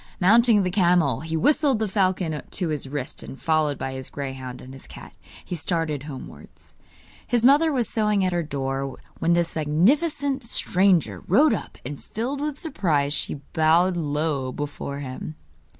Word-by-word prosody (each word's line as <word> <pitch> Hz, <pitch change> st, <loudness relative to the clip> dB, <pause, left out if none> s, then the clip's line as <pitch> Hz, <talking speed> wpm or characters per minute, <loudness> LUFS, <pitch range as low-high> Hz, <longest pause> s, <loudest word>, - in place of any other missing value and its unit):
Mounting 220 Hz, +2 st, +5 dB
the 180 Hz, -, -1 dB
camel, 175 Hz, -7 st, +3 dB
he 160 Hz, +2 st, -3 dB
whistled 290 Hz, -, +3 dB
the 220 Hz, 0 st, -1 dB
falcon 185 Hz, -5 st, 0 dB
to 180 Hz, -3 st, -2 dB
his 150 Hz, -3 st, -3 dB
wrist, 140 Hz, -2 st, -4 dB
and, 135 Hz, -, -9 dB
followed 155 Hz, -3 st, +1 dB
by 135 Hz, -, -4 dB
his 130 Hz, 0 st, -6 dB
greyhound 130 Hz, -2 st, -6 dB
and 130 Hz, -, -11 dB
his 135 Hz, -, -11 dB
cat, -, -, -12 dB, 0.3 s
he -, -, -6 dB
started 165 Hz, -3 st, -1 dB
homewards. 140 Hz, -2 st, -11 dB, 0.5 s
His 240 Hz, 0 st, +2 dB
mother 295 Hz, +5 st, +5 dB
was 250 Hz, -5 st, 0 dB
sewing 210 Hz, -3 st, +1 dB
at 185 Hz, -, 0 dB
her 175 Hz, -, +1 dB
door 135 Hz, -3 st, -3 dB, 0.2 s
when 170 Hz, -, +2 dB
this 170 Hz, -1 st, 0 dB
magnificent 270 Hz, -, +1 dB
stranger 190 Hz, -5 st, +2 dB
rode 255 Hz, -, +5 dB
up, -, -, -5 dB
and, 140 Hz, +2 st, -7 dB
filled 260 Hz, +6 st, -4 dB
with 295 Hz, -1 st, -2 dB
surprise, 155 Hz, -, 0 dB
she 145 Hz, -1 st, -3 dB
bowed 165 Hz, +3 st, +3 dB
low 150 Hz, -4 st, -1 dB
before 145 Hz, 0 st, -5 dB
him. 135 Hz, +3 st, -6 dB
165 Hz, 165 wpm, -24 LUFS, 145-215 Hz, 0.5 s, Mounting